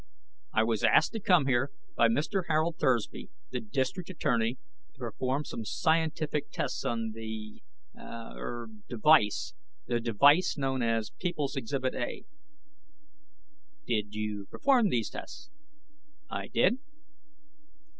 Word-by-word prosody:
"I 110 - +3
was 110 -2 0
asked - - +5
to 225 - -2
come 180 -7 +4
here 130 +1 +2 0.3
by 115 - +5
Mr. 155 - 0
Harold 160 +1 +1
Thursby, 120 -5 0 0.2
the 125 - -1
District 130 - -2
Attorney, 120 -8 0 0.4
to - - -30
perform 130 +3 -2
some 115 - -5
scientific 155 +2 0
tests - - -3
on 115 -1 -1
the... 110 -1 -7 0.3
er... 115 +1 -7 0.2
device... 120 -2 +4 0.3
the 120 -1 0
device 140 - +4
known 135 -2 0
as 115 -2 0
People's 155 -6 -2
Exhibit 130 0 -1
A." 120 - -4 1.6
"Did 105 -1 -1
you 105 -2 -3
perform 255 -6 +3
these 115 - 0
tests?" 300 0 -9 0.8
"I - - -3
did." 250 - +3
130 Hz, 120 wpm, -30 LUFS, 115-155 Hz, 1.6 s, asked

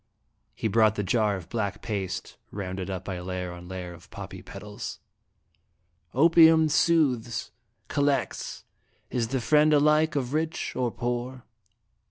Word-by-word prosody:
He - - -1
brought 110 0 +4
the 105 - -1
jar 105 0 +2
of 90 -4 -8
black 105 -4 -3
paste, 100 -5 -4
rounded 95 -1 -5
up 95 -1 -4
by 95 -2 -4
layer 90 0 -4
on 90 0 -10
layer 90 -1 -6
of 85 +1 -15
poppy - - -8
petals. - - -7 0.6
" 85 0 -44
Opium 160 -1 +7
soothes, 130 -9 +2 0.4
collects, 140 -3 -1 0.5
is 120 -2 0
the 130 +3 -1
friend 150 +6 +4
alike 150 +2 +4
of 135 -2 -1
rich 160 +1 -2
or 125 -1 0
poor. 120 +1 -3
115 Hz, 140 wpm, -27 LUFS, 95-145 Hz, 0.6 s, Opium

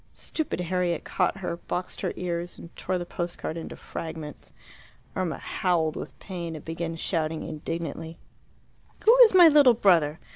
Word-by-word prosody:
Stupid 315 - -3
Harriet 180 -1 -1
caught 185 +1 0
her, 180 -3 -3
boxed 180 +1 -4
her - - -1
ears, 175 -1 -3
and 170 - -12
tore 185 0 -2
the 175 - -4
post 175 0 -4
card 160 - -4
into 165 - -6
fragments. 160 -2 -7 0.6
Irma 180 -4 -1
howled 165 -4 0
with - - -7
pain, 170 -4 -6
and 150 - -9
began 165 0 -4
shouting 160 -1 -1
indignantly, 165 +1 -5 0.9
"Who 455 +3 +8
is 450 -6 +8
my 350 -2 +10
little 285 -6 +7
brother? 165 -8 +3
170 Hz, 155 wpm, -27 LUFS, 165-185 Hz, 0.9 s, my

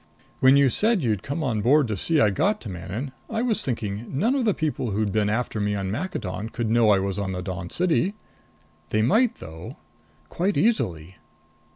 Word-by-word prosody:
"When 130 +1 +6
you 140 -1 +5
said 215 - +1
you'd 110 -5 0
come 145 +4 -3
on 115 -6 0
board 135 +5 +4
to 105 - -1
see 160 - +1
I 105 -7 +4
got 205 - +1
to 110 - -7
Manon, 95 +9 -5 0.2
I 225 +1 -1
was 235 -4 0
thinking 115 -3 -3
none 225 - +2
of 270 -4 0
the 210 - +3
people 150 -6 -2
who'd 105 0 -1
been 105 0 +1
after 115 0 -1
me 105 0 0
on 95 -1 -3
Maccadon 110 - -4
could 115 -2 -2
know 115 -1 +4
I 100 - +5
was 95 +1 -2
on 95 -2 -2
the 90 0 -4
Dawn 90 -2 -5
City. 180 +3 +1 0.7
They 110 0 +1
might 225 - +3
though. 80 +1 -10 0.5
Quite 190 +4 -1
easily." 90 - 0
115 Hz, 200 wpm, -24 LUFS, 100-165 Hz, 0.7 s, When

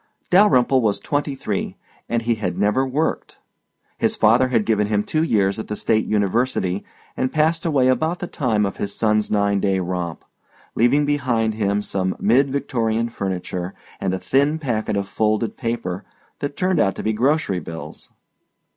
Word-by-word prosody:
Dalyrimple 135 -9 +5
was 105 -3 +1
twenty 145 -1 -2
three 105 -7 -3 0.3
and 120 -1 0
he 120 +1 +2
had 90 -6 -3
never 105 +7 +2
worked. 140 +5 -2 0.6
His - - +1
father 120 +4 +4
had 115 -4 +1
given 105 -2 +1
him 105 -1 +1
two 155 +8 0
years 100 -9 +1
at 110 - -5
the 105 - -3
State 110 +1 +1
University 105 -2 0 0.3
and 130 - -1
passed 160 +2 +1
away 135 -5 +3
about 160 +7 +1
the - - -4
time 115 -11 0
of 100 - -4
his 100 0 -3
son's 105 -1 +1
nine 100 -1 +2
day 95 -1 +1
romp, 90 -2 -4 0.5
leaving 135 +6 +3
behind 125 -7 0
him 105 -1 0
some 95 -2 -2
mid 130 +6 +3
Victorian 115 -4 -1
furniture 95 -3 -4 0.2
and 95 -1 -1
a - - -2
thin 140 +8 +1
packet 115 -8 -2
of 100 -1 -2
folded 110 +2 0
paper 115 -5 -3 0.4
that 145 0 -4
turned 185 -2 +1
out 95 - +2
to - - -6
be 110 - 0
grocery 130 - +1
bills. 80 -2 -9
110 Hz, 170 wpm, -21 LUFS, 100-135 Hz, 0.6 s, Dalyrimple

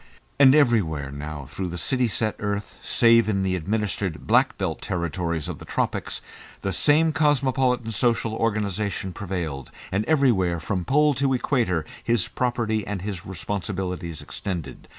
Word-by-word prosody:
And 135 0 +8
everywhere 95 - +2
now 70 0 -6
through 95 +7 -4
the 90 0 -5
city 125 +10 +1
set 110 0 -1
earth, 105 0 -3
save 115 -2 +4
in 95 -2 +1
the 95 -1 +1
administered 100 -1 -2
"black - - +3
belt" - - -2
territories 85 -2 -2
of - - -5
the - - -9
tropics, - - -2 0.4
the 95 - -1
same 155 - +4
cosmopolitan 130 -6 +2
social 115 0 +1
organisation 105 -4 -1
prevailed, 85 -9 -4 0.2
and 100 +3 +1
everywhere 115 - +3
from 90 +3 -2
Pole 150 +2 +4
to 135 0 +1
Equator 115 - 0 0.2
his 115 -5 +1
property 120 -3 0
and 100 -3 -3
his 100 -4 -5
responsibilities 90 -4 -4
extended. 75 -1 -5
100 Hz, 145 wpm, -24 LUFS, 90-120 Hz, 0.4 s, And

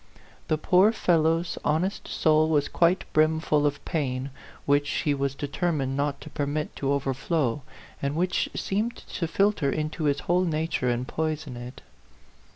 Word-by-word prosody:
The 155 - +1
poor 185 +6 +4
fellow's 165 -4 +1
honest 170 +7 0
soul 155 0 +3
was 145 -2 +2
quite 175 +2 +2
brimful 155 -1 +3
of 145 0 -4
pain, 135 -3 -2 0.3
which 145 +1 +2
he 150 - 0
was 140 -1 -1
determined 145 -2 -1
not 140 0 -1
to 155 - -9
permit 145 0 -2
to 135 0 0
over 140 -1 0
flow, 140 -1 -1 0.4
and 140 +1 -1
which 180 +2 0
seemed 215 +5 -1
to 170 - -4
filter 195 -3 +2
into 155 +1 -2
his 145 0 +1
whole 180 +3 +2
nature 160 -5 -1
and 120 +1 -1
poison 155 -3 -3
it. 120 +2 -9
155 Hz, 155 wpm, -26 LUFS, 140-165 Hz, 0.4 s, poor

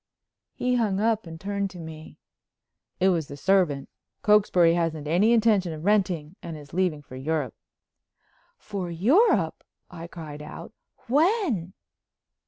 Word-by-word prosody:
He 250 0 +1
hung 205 -5 +1
up 220 -3 +1
and 160 0 -9
turned 200 +1 -2
to 185 - -12
me: 160 -1 -10 0.8
"It 190 +1 +4
was 165 -5 0
the 140 - -9
servant. 170 -6 +2 0.4
Cokesbury 195 -5 +5
hasn't 165 -3 -1
any 185 +8 +3
intention 215 -7 +3
of 155 +2 -8
renting 185 -6 +1
and 165 -2 -7
is 145 0 -13
leaving 175 -5 0
for 130 - -12
Europe." 140 -1 -2 1.0
"For 190 -3 -5
Europe!" 255 - +3 0.3
I 170 -1 -8
cried 155 -4 -9
out. 165 +6 -9 0.3
"When?" 285 - +1
180 Hz, 135 wpm, -26 LUFS, 160-210 Hz, 1.0 s, Cokesbury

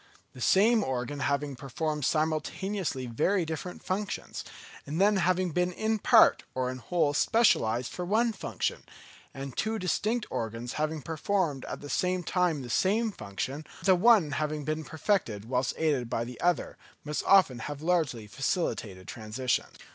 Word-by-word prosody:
The 130 - -11
same 215 - +4
organ 130 +2 -3
having 140 +1 -1
performed 150 +3 -3
simultaneously 155 0 -1
very 170 - +1
different 160 +3 -6
functions, 200 +2 -3 0.4
and 155 +4 -3
then 205 +1 +4
having 185 0 +1
been 180 +3 +1
in 220 +4 -1
part - - +6
or 130 -1 0
in 130 - -7
whole 145 +4 +1
specialised 125 - +3
for 180 - -4
one 225 +5 +2
function; 195 - -3 0.5
and 135 -1 -7
two 220 +1 -1
distinct 215 +5 0
organs 115 +2 -4
having 155 -1 -2
performed 160 -3 -1
at - - -6
the 145 - -8
same 180 +4 0
time 170 -5 0
the - - -7
same 215 - +2
function, 130 - -5 0.2
the 190 - +6
one 190 -4 +5
having 150 0 -2
been 155 +2 -2
perfected 155 - -1
whilst 125 +1 -1
aided 145 -7 0
by 115 - -1
the 125 +1 -8
other, 175 0 0 0.3
must 150 0 -3
often 180 -11 +5
have 145 +5 -6
largely 160 -10 +1
facilitated 105 - -2
transitions. 115 +3 -2
155 Hz, 155 wpm, -29 LUFS, 130-185 Hz, 0.5 s, part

